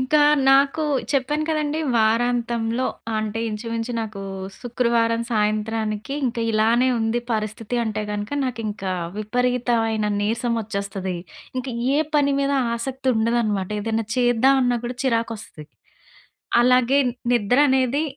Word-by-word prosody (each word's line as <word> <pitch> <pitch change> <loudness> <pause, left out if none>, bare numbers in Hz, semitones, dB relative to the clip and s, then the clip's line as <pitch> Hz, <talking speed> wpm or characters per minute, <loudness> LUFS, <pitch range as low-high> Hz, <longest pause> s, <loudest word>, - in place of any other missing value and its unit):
ఇంకా 295 +4 +3 0.3
నాకు 275 +3 +4 0.3
చెప్పాను 295 +3 0
కదండీ. 305 0 0 0.2
వారాంతంలో 235 +1 +1 0.3
ఆహ్, - - 0
అంటే, 215 +1 -3
ఇంచుమించు 230 +2 -4
నాకు 215 -3 -6 0.4
శుక్రవారం 235 -1 +1
సాయంత్రానికి, 215 +2 -1
ఇంక 240 0 -3
ఇలానే 230 +4 +3
ఉంది 225 +1 0
పరిస్థితి 215 +2 -3
అంటే 215 -1 -2
గనక, 205 0 -4
నాకింకా 215 -6 -3 0.3
విపరీతవైన 230 -1 0
నీరసం 230 +3 0
వచ్చేస్తది. 200 -3 -4 0.4
ఇంక 255 - -4 0.3
ఏ - - +3 0.2
పని 280 -1 +3
మీదా 280 0 +1 0.2
ఆసక్తుండదనమాట. 235 -5 0
ఏదెనా 225 +1 -1
చేద్దాం 245 +2 +4
అన్నా 245 -1 +1
కూడా 245 +1 -4
చిరాకొస్తది. 230 - -2 0.9
అలాగే, 250 +2 +4 0.4
నిద్ర 240 +1 +2
అనేది 265 +2 +2
230 Hz, 110 wpm, -22 LUFS, 215-250 Hz, 0.9 s, నాకు